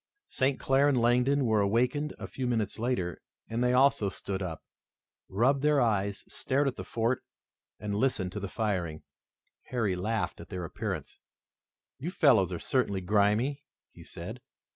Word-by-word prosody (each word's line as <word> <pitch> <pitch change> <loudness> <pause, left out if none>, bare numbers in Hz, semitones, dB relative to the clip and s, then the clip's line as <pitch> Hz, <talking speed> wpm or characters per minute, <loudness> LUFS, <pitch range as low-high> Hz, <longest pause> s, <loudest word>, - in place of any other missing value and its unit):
St. 130 +1 0
Clair 135 +2 +3
and 130 -3 +2
Langdon 125 +4 +3
were 110 -2 +3
awakened 125 +8 +1
a - - -6
few 130 -2 -4
minutes 115 -3 -1
later, 105 -8 -1 0.3
and 115 +2 -1
they 125 - +3
also 130 -5 +4
stood 95 0 -4
up, 85 -4 -5 0.7
rubbed 130 +8 +2
their 150 0 +4
eyes, 100 -4 +1
stared 140 +2 0
at 135 - -1
the - - -6
fort 115 +2 -1 0.6
and 105 -1 -3
listened 100 -5 0
to 105 - -4
the 100 -1 -5
firing. 90 -9 -2 0.6
Harry 110 -7 0
laughed 110 +4 -2
at - - -12
their 90 -2 -4
appearance. - - -5 0.8
"You - - -3
fellows - - +4
are - - -2
certainly 95 -2 0
grimy," 105 +8 +2 0.3
he - - -14
said. - - -8
115 Hz, 160 wpm, -29 LUFS, 100-130 Hz, 0.8 s, also